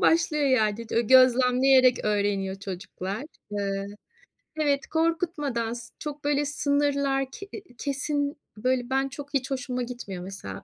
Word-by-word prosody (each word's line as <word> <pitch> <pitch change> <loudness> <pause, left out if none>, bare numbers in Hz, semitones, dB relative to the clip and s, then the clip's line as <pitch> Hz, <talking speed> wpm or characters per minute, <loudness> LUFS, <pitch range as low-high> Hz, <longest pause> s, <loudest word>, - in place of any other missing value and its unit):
başlıyor 325 -3 +3
yani. 225 -3 +1
Dö 230 - +2
gözlemleyerek 255 +1 +5
öğreniyor 200 -2 0
çocuklar. 190 +3 -5 0.3
Iıı, 200 -1 -2 0.7
evet, 285 -3 +1
korkutmadan, 315 -8 0
s 235 -1 -6
çok 295 -1 -6
böyle 290 0 +2
sınırlar 280 -1 +1
ke 400 - -9
eee, 415 - -7 0.2
kesin, 285 +1 -1 0.2
böyle, 250 +2 0
ben, 270 +1 +1
çok, 285 +2 -9
hiç 270 -1 0
hoşuma 255 -1 -2
gitmiyor 235 -7 -6
mesela, 195 +1 -7
260 Hz, 130 wpm, -26 LUFS, 225-285 Hz, 0.7 s, gözlemleyerek